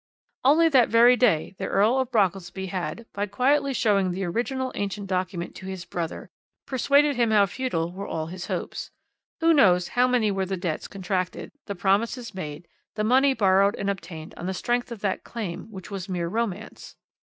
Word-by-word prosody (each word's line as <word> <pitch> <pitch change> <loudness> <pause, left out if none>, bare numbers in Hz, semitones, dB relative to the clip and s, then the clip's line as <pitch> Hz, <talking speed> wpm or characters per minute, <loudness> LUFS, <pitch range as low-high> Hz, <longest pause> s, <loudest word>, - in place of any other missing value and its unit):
"Only 310 +5 +5
that 260 -7 +4
very 235 +2 +6
day 190 -10 +2
the - - -2
Earl 220 +7 +3
of 260 -2 -1
Brockelsby 190 -3 0
had, 185 +5 -4
by 205 +1 -2
quietly 275 +6 +2
showing 200 -7 +2
the 185 +2 -3
original 255 +8 -2
ancient 200 0 -3
document 185 -2 -3
to 190 - -9
his 190 -2 -6
brother, 170 -2 -5 0.3
persuaded 280 +2 +3
him 235 -2 +3
how 210 -2 +5
futile 195 -6 -2
were 195 +2 -6
all 160 -1 -3
his 175 +2 -7
hopes. - - -4 0.5
Who 330 0 +5
knows 180 - +4
how 245 +1 +3
many 240 -4 +2
were 195 -1 -1
the 190 0 -2
debts 170 -3 -3
contracted, 185 -1 -3 0.2
the 200 - -4
promises 225 +6 0
made, 155 -2 -7 0.3
the 215 - -1
money 265 +4 +4
borrowed 200 -2 +4
and 200 0 -1
obtained 170 -4 -8
on 175 - -5
the 190 - -2
strength 240 +4 -1
of 225 -4 -7
that 195 -2 -1
claim 210 -8 -5
which 190 -1 -10
was 195 -1 -5
mere 175 -2 -2
romance? 215 +1 -4
200 Hz, 185 wpm, -25 LUFS, 185-245 Hz, 0.5 s, very